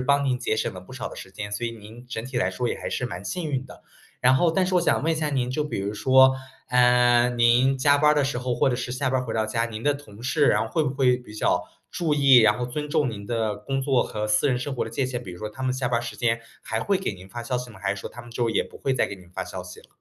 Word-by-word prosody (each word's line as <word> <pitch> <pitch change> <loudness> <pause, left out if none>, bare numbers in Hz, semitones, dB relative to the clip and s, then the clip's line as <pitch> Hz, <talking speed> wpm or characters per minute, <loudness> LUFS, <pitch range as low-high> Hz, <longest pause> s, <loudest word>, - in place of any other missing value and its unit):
帮 140 +1 +3
您 130 -2 +1
节 110 - -1
省 110 - -2
了 90 - -8
不 90 - -14
少 130 - -5
的 - - -11
时 95 - -10
间， 105 +2 -7
所 105 +3 -3
以 115 - -1
您 115 +2 -12
整 115 -1 -4
体 130 -1 -6
来 95 -6 +1
说， 120 +7 -2
也 - - -2
还 - - -5
是 125 - -2
蛮 90 -2 -7
幸 175 -4 -3
运 130 -3 -2
的。 130 - -14 0.4
然 125 +1 +5
后 170 +5 +3
但 185 +2 +2
是 185 - -1
我 180 - +5
想 - - +2
问 165 +1 +2
一 - - -1
下 150 -1 -1
您， 125 -3 0
就 150 +4 -1
比 150 - -4
如 100 +2 -3
说， 130 +3 +5 0.3
嗯， 125 -1 +4
您 125 +3 +4
加 140 +2 +4
班 150 +1 +4
儿 - - +4
的 145 - +3
时 135 -2 -1
候， 125 0 -1
或 - - +2
者 125 - 0
是 125 0 -4
下 130 +1 -1
班 130 0 +1
儿 125 - -2
回 115 - -4
到 110 -1 0
家， 115 +1 0
您 110 -1 -6
的 145 0 +2
同 115 -6 -12
事 140 +3 +2
然 105 - +3
后 110 - -5
会 160 -2 +1
不 135 - 0
会 130 -2 +3
比 125 -4 -13
较 105 - 0 0.3
注 165 -4 -1
意， 140 -3 +6
然 110 -3 +6
后 125 - -2
尊 150 +3 -5
重 150 -4 +2
您 100 -2 -8
的 110 -2 -1
工 135 0 -3
作 130 -2 +2
和 105 0 -4
私 105 +7 +3
人 125 -3 +1
生 135 +2 -4
活 - - -1
的 - - -7
界 135 - -1
限。 125 -1 -4
比 90 - -8
如 90 - -10
说 105 +2 -4
他 130 +5 -9
们 130 -1 +1
下 130 -1 -1
班 120 - +1
儿 - - -4
时 115 -3 -6
间， 115 -1 +1 0.2
还 110 0 -2
会 200 -2 +1
给 190 - -3
您 95 0 -13
发 120 +4 -7
消 125 +1 -2
息 125 0 -5
吗？ 95 -4 -14
还 100 0 0
是 100 - -8
说 - - -6
他 - - -10
们 120 0 -13
之 120 - -3
后 115 - +2
也 - - +1
不 - - -13
会 135 - -1
再 130 - +2
给 - - -6
您 90 - -16
发 95 +1 -4
消 90 0 -7
息 90 0 -11
了？ - - -20
125 Hz, 355 characters per minute, -25 LUFS, 110-135 Hz, 0.4 s, 意